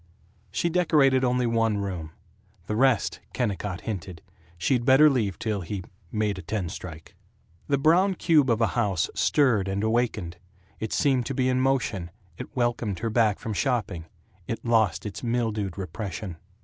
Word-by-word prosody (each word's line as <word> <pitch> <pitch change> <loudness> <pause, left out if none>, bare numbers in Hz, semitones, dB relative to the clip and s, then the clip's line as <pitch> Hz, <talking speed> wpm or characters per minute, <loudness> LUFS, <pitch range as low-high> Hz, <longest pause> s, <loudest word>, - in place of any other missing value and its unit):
She - - 0
decorated 150 -7 +3
only 125 0 +2
one 115 -2 +1
room. 95 -6 -4 0.6
The 105 - -2
rest, 130 -2 +2
Kennicott 100 -5 -2
hinted, 90 -5 -6 0.3
she'd 120 +8 +1
better 135 +4 +6
leave 110 -8 0
till 105 -3 -2
he 95 +2 -5 0.3
"made 105 -3 -1
a - - -6
ten 95 0 -3
strike." 80 -4 -9 0.5
The 140 - +2
brown 175 +7 +4
cube 155 -7 +3
of 115 0 +2
a 115 - +4
house 100 -9 0
stirred 120 -10 +2
and 100 +2 -1
awakened; 110 -6 0 0.4
it 110 - -4
seemed 135 -5 +2
to 135 - -3
be 130 0 +1
in 130 0 +2
motion; 125 -10 0 0.3
it 125 - -9
welcomed 120 -5 0
her 115 +3 -2
back 110 -3 +3
from 110 - -5
shopping; 105 - -1 0.4
it 115 - -4
lost 110 -6 +2
its 105 0 -6
mildewed 110 -6 -1
repression. 95 -2 -5
110 Hz, 160 wpm, -26 LUFS, 100-130 Hz, 0.6 s, better